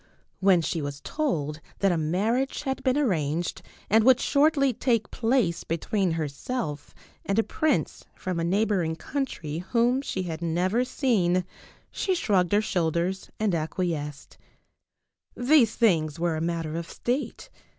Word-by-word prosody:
When 190 -3 +4
she 165 0 -1
was 145 0 -5
told 160 - -2 0.2
that 195 -1 +2
a - - +2
marriage 205 - 0
had 265 -2 -2
been 260 0 +1
arranged 170 - 0 0.3
and 220 +2 +4
would 255 +1 +6
shortly 280 -2 +3
take 230 -3 0
place 225 -8 +1
between 175 +2 -1
herself 150 - -4 0.3
and 195 - -1
a 225 - +4
prince 310 +6 -1
from 185 -3 -3
a - - 0
neighboring 185 -3 +1
country 165 - -4
whom 240 +7 +1
she 190 -8 -3
had 165 -2 -5
never 180 +8 +1
seen 185 - +1 0.5
she 380 -2 0
shrugged 195 - +1
her 205 +1 +4
shoulders 175 0 -1
and 215 -3 +1
acquiesced. 155 -3 -3 1.0
These 245 -3 +4
things 165 -10 +2
were 170 -1 0
a 155 - -3
matter 165 -2 -2
of 170 0 -5
state. 250 +4 -3
185 Hz, 140 wpm, -26 LUFS, 165-245 Hz, 1.0 s, would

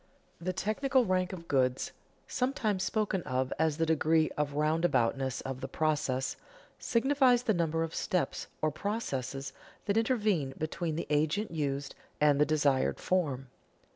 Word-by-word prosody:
_ - - -10
The 185 - 0
technical 245 +8 +1
rank 185 -2 +1
of 170 -3 -8
goods 130 -2 +1 0.4
(sometimes 245 -7 0
spoken 200 -1 0
of 130 -3 -1
as 160 -2 +2
the 165 - +2
degree 160 0 +2
of 145 -1 -1
roundaboutness 145 -4 +1
of 135 -1 -5
the 135 - -3
process) 145 -3 0 0.4
signifies 255 0 +3
the 220 - +2
number 165 -2 0
of 165 0 -4
steps 180 - -1 0.2
or 155 - +3
processes 140 - -3 0.3
that 205 +1 +1
intervene 210 - +1
between 160 +1 -2
the 165 - -3
agent 155 +8 +1
used 140 -3 -2 0.3
and 145 -1 +4
the 150 - +4
desired 145 -4 +2
form. 140 -8 0
160 Hz, 145 wpm, -31 LUFS, 140-200 Hz, 0.4 s, and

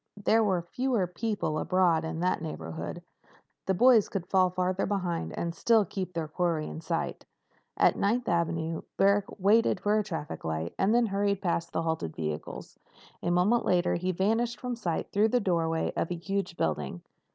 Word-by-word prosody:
There 220 +2 +3
were 185 -5 +1
fewer 245 +2 0
people 180 -3 -2
abroad 175 -3 +2
in 160 +1 -4
that 180 -2 +1
neighborhood. 80 - -6 0.6
The 190 - +2
boys 240 0 +5
could 190 -3 -3
fall 185 0 +3
farther 185 +1 -1
behind 175 - -2
and 170 0 -2
still 220 +4 +3
keep 185 0 -5
their 165 -2 -2
quarry 165 -1 -1
in 160 - -7
sight. 165 0 -3 0.5
At - - +4
Ninth 235 +4 0
Avenue, 165 -1 0 0.2
Barrack 200 +1 +4
waited 205 +1 +3
for 210 +2 +2
a - - 0
traffic 165 -7 -5
light 80 +1 -3
and 205 +4 +3
then 240 0 +4
hurried 200 -1 0
past 170 -2 -1
the 165 - -1
halted 160 - -2
vehicles. 75 -1 -5 0.4
A 175 - -1
moment 180 +7 +3
later 180 -1 +2
he 180 +2 -1
vanished 225 +6 0
from 250 -1 -3
sight 175 -8 -3
through 210 +2 +3
the 245 - +2
doorway 165 -5 0
of - - -1
a 175 - -2
huge 195 +1 -3
building. 75 +1 -2
180 Hz, 175 wpm, -29 LUFS, 165-205 Hz, 0.6 s, boys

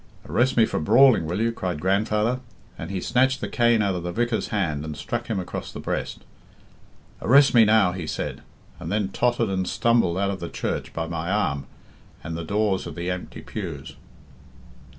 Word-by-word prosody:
'Arrest 125 +1 +1
me 115 - +6
for - - -2
brawling, 120 - +5
will 90 +5 -2
you?' 115 +1 +1
cried 90 -8 -3
grandfather, 105 +6 +1 0.4
and 80 - -7
he 95 -1 -2
snatched 130 +6 +2
the - - -3
cane 120 -2 +3
out 100 -1 +1
of 90 - -3
the 90 +1 -4
vicar's 120 +3 -1
hand 80 -9 -1
and 75 -1 -6
struck 120 0 -4
him 110 -4 -1
across 90 - -6
the - - -8
breast. - - -4 1.0
'Arrest 135 +5 +5
me 115 -2 +7
now,' 105 -4 +4
he 90 -3 -5
said, - - -4 0.4
and - - -6
then 105 -2 0
tottered 120 +1 +1
and 95 -1 -1
stumbled 115 -4 +2
out 100 0 +1
of 95 - -5
the 85 - -5
church - - -3
by 80 - -3
my 85 +1 -4
arm 95 -9 0 0.6
and 80 +1 -5
the 85 - -4
doors 100 +2 0
of - - -8
the 85 +1 -3
empty 90 0 -6
pews." - - -7
100 Hz, 190 wpm, -24 LUFS, 90-115 Hz, 1.0 s, me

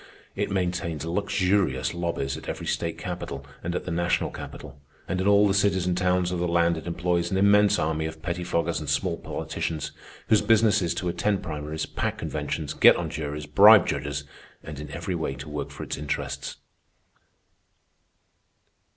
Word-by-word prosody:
It 100 +1 -1
maintains 90 -4 -2
luxurious 90 -6 +1
lobbies 85 -5 -2
at 80 - -8
every - - -5
state - - -2
capital, 70 0 -5 0.2
and 85 +1 -2
at - - -3
the 90 - -4
national 85 +1 0
capital; 70 +1 -9 0.3
and 95 +1 -1
in 95 - 0
all 100 0 +6
the 95 - +2
cities 100 -2 +2
and 90 -1 +1
towns 90 0 +1
of 90 - -2
the 90 - 0
land 85 0 +3
it 80 - -7
employs 85 0 0
an 95 - 0
immense 105 +1 +5
army 80 0 0
of 80 0 -8
pettifoggers 85 -1 -1
and - - -5
small - - +1
politicians 80 -2 -4 0.4
whose 110 - +4
business 110 -1 +4
is 85 - -1
to 90 +1 -3
attend 100 +3 0
primaries, 75 0 -4
pack - - -3
conventions, 75 -3 -3
get - - +7
on - - -3
juries, 75 0 -4
bribe 100 +8 +8
judges, 70 0 -2 0.4
and 75 -2 -8
in 75 - -7
every 95 - -4
way 80 -5 -2
to 70 - -9
work 75 -1 -4
for - - -8
its - - -4
interests. 75 0 -4
85 Hz, 175 wpm, -26 LUFS, 80-95 Hz, 0.4 s, bribe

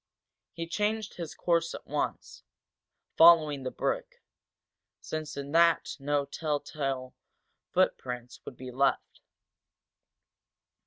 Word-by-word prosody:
He 165 - -4
changed 210 +3 -1
his 170 -4 -6
course 170 -1 +1
at - - -10
once, - - -3 0.8
following 160 -4 +7
the 130 - -3
brook, - - -2 0.8
since 155 -2 -5
in 140 0 -5
that 170 +1 +3
no 145 0 0
telltale 140 -3 -3 0.6
footprints 125 -1 -1
would 125 - -9
be 130 0 -8
left. 135 +2 0
145 Hz, 100 wpm, -29 LUFS, 135-170 Hz, 0.8 s, following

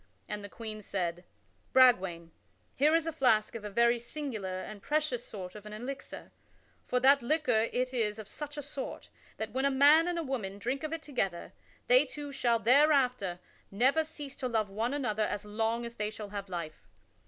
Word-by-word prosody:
And 210 -1 -5
the 205 - -7
Queen 215 -1 -6
said: 175 -3 -3 0.5
"Bragwaine, 190 -10 +4 0.4
here 300 +4 +4
is 330 -1 +2
a 325 - -1
flask 245 -8 +3
of 230 - -7
a 210 - -4
very 235 +3 +3
singular 230 -8 -5
and 205 -2 -9
precious 295 -4 0
sort 185 -4 -8
of 210 0 -10
an 210 - -8
elixir; 255 +6 -7 0.6
for 250 - +1
that 275 +2 +5
liquor 240 -4 +2
it 255 +1 -1
is 215 -4 0
of 215 -2 -8
such 295 +5 -7
a 290 - -4
sort 280 -1 -7 0.3
that 220 0 -4
when 260 +3 -1
a 275 - +4
man 290 +5 +6
and 350 -1 -1
a 335 - -1
woman 225 -9 -3
drink 250 +7 -2
of 310 - -3
it 325 -1 -4
together, 195 - -3 0.3
they - - +6
two 290 -1 -7
shall 240 -4 +2
thereafter 250 - +3 0.3
never 260 +10 +3
cease 295 -3 -8
to 255 - -2
love 220 -4 0
one 230 +7 -1
another 220 -7 -1
as 205 0 -4
long 225 +3 -1
as 235 - -7
they 210 -2 -2
shall 215 -1 -8
have 200 -1 -6
life. 170 -4 -6
235 Hz, 195 wpm, -31 LUFS, 210-280 Hz, 0.6 s, man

